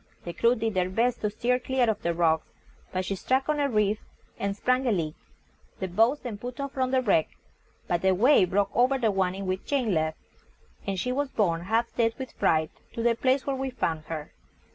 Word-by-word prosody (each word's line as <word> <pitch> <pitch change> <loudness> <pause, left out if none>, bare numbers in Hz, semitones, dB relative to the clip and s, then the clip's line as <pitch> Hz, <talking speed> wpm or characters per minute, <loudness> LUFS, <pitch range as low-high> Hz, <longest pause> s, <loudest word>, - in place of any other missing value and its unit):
The 170 - -5
crew 235 +6 +3
did 225 -2 -1
their 185 -1 +1
best 235 +5 +1
to 210 - +1
steer 245 +4 0
clear 255 -1 +1
of 215 -2 0
the 170 - 0
rocks, 160 -2 +2 0.4
but 185 -1 -2
she 195 - -2
struck 260 +7 0
on 300 -1 +1
a 285 -1 +2
reef 210 -2 +1 0.4
and 200 0 -2
sprung 255 +3 +1
a - - +3
leak. 165 -6 -1 0.7
The 190 - -2
boats 225 +10 +2
then 225 -5 -6
put 245 +2 -7
off 280 -1 -3
from 260 -1 -1
the 260 0 +2
wreck, 195 -8 +3 0.6
but 175 0 -1
a 190 - +4
wave 205 -2 +5
broke 200 +1 +1
over 255 +3 +4
the 230 -4 +2
one 190 -1 0
in 195 0 -5
which 185 0 -2
Jane 255 -8 +1
left, 160 -1 0 0.7
and 195 -1 -1
she 250 - -1
was 280 +2 -1
borne, 170 -9 +1
half 225 +4 0
dead 230 -1 +2
with 260 -2 -6
fright, 155 -1 +1 0.2
to 230 - -3
the 235 0 +4
place 260 +3 +1
where 275 - -1
we 265 0 -2
found 160 -11 -2
her. 155 -2 -6
220 Hz, 225 wpm, -27 LUFS, 185-255 Hz, 0.7 s, wave